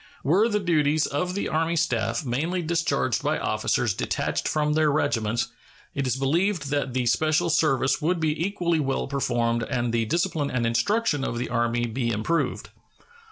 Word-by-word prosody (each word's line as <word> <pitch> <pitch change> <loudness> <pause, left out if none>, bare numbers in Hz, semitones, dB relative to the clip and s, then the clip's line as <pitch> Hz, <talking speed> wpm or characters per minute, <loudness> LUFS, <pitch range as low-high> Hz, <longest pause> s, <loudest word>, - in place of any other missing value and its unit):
Were 195 +11 +3
the 210 -2 +1
duties 155 -4 +2
of 180 +6 -2
the 200 - -1
Army 165 +2 0
staff 115 -4 0
mainly 160 +9 -1
discharged 165 - 0
by - - 0
officers - - 0
detached - - -2
from 150 -1 +1
their 155 -1 +3
regiments, 115 -6 0 0.4
it 140 -2 -2
is 125 - +1
believed 155 +2 0
that 140 -3 -1
the 125 -1 +1
special 155 +8 +2
service 135 -5 +2
would 170 +3 +1
be 160 0 0
equally 175 -5 0
well 135 -2 -1
performed 120 -4 0
and 120 0 -2
the 115 -1 +1
discipline 160 - 0
and 125 -2 -1
instruction 150 - +1
of 120 - -2
the 120 - -3
Army 120 0 0
be 120 +1 -2
improved. 115 +10 -1
145 Hz, 165 wpm, -25 LUFS, 120-165 Hz, 0.4 s, Were